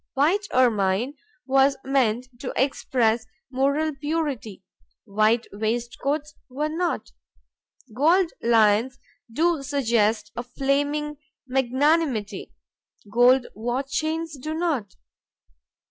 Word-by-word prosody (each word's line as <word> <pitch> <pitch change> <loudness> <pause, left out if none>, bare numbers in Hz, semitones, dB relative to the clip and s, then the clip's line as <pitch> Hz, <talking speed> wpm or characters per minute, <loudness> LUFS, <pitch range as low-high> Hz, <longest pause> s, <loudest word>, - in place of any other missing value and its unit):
White 350 +9 +2
ermine 225 0 +2 0.3
was 270 +1 +3
meant 255 -3 +1
to 250 - -4
express 240 -4 +1 0.2
moral 280 +4 +1
purity; 280 - -3 0.4
white 215 +2 +2
waistcoats 240 +7 -2 0.2
were 295 +4 -2
not. 340 +2 -2 0.8
Gold 330 +7 +3
lions 230 +2 +3 0.3
do 325 +4 +1
suggest 230 -6 +1
a - - -2
flaming 285 +4 -1 0.3
magnanimity; 260 - 0 0.6
gold 245 +2 +5
watch 245 +5 -3
chains 315 +1 -2
do 310 +4 -4
not. 295 - -2
265 Hz, 90 wpm, -24 LUFS, 230-300 Hz, 0.8 s, gold